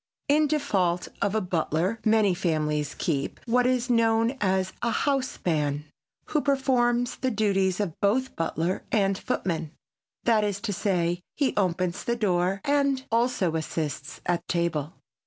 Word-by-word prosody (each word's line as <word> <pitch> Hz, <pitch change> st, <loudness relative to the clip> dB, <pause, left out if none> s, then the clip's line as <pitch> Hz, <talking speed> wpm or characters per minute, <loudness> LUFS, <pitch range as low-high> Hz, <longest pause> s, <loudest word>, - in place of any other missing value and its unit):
In 300 Hz, +1 st, +4 dB
default 195 Hz, -, 0 dB
of 200 Hz, +1 st, +1 dB
a 220 Hz, -, +2 dB
butler 180 Hz, +3 st, -1 dB
many 215 Hz, -3 st, +4 dB
families 150 Hz, -4 st, -1 dB
keep 140 Hz, -1 st, -2 dB
what 250 Hz, +1 st, +3 dB
is 250 Hz, -1 st, +1 dB
known 230 Hz, 0 st, +3 dB
as 190 Hz, -1 st, +1 dB
a 235 Hz, -, +1 dB
house 270 Hz, +1 st, 0 dB
man, 150 Hz, -3 st, 0 dB, 0.4 s
who 300 Hz, -, +1 dB
performs 245 Hz, -4 st, +1 dB
the 260 Hz, -, 0 dB
duties 195 Hz, -4 st, +1 dB
of 200 Hz, -6 st, -1 dB
both 255 Hz, +6 st, +1 dB
butler 165 Hz, +2 st, -1 dB
and 195 Hz, -2 st, +2 dB
footman; 165 Hz, -4 st, -2 dB, 0.5 s
that 225 Hz, -3 st, +3 dB
is 205 Hz, -1 st, -1 dB
to 210 Hz, -2 st, -2 dB
say, 175 Hz, -3 st, 0 dB, 0.2 s
he 280 Hz, -3 st, +1 dB
opens 180 Hz, -2 st, 0 dB
the 235 Hz, -, 0 dB
door 190 Hz, -3 st, +1 dB
and 280 Hz, -2 st, +1 dB
also 230 Hz, -8 st, +1 dB
assists 155 Hz, -1 st, -4 dB
at 175 Hz, -1 st, -1 dB
table. 170 Hz, -3 st, -1 dB
200 Hz, 145 wpm, -26 LUFS, 170-240 Hz, 0.5 s, In